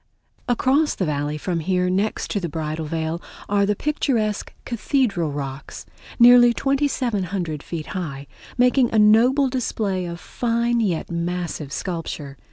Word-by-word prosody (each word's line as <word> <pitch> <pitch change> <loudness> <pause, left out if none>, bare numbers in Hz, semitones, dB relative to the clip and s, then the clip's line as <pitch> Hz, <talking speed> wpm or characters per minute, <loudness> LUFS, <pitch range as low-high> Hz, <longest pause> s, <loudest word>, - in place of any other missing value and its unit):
Across 270 +5 +2
the 185 - -1
Valley 150 0 -2
from 170 +2 -2
here, 180 +2 0
next 195 +4 -1
to 205 - 0
the 175 -3 -3
Bridal 155 0 -4
Veil, 160 +1 -2 0.3
are 200 0 +2
the 210 - +1
picturesque 230 -7 -1
Cathedral 225 - 0
Rocks, 140 -1 -6 0.3
nearly 240 0 +7
2700 205 - -1
feet 160 -1 -6
high, 145 -7 -5 0.3
making 250 0 +3
a 225 - +1
noble 235 +6 +5
display 215 -7 -2
of 170 0 -6
fine 235 +3 0
yet 180 -7 -1
massive 170 -3 -3
sculpture. 160 -5 -5
190 Hz, 135 wpm, -22 LUFS, 165-240 Hz, 0.3 s, nearly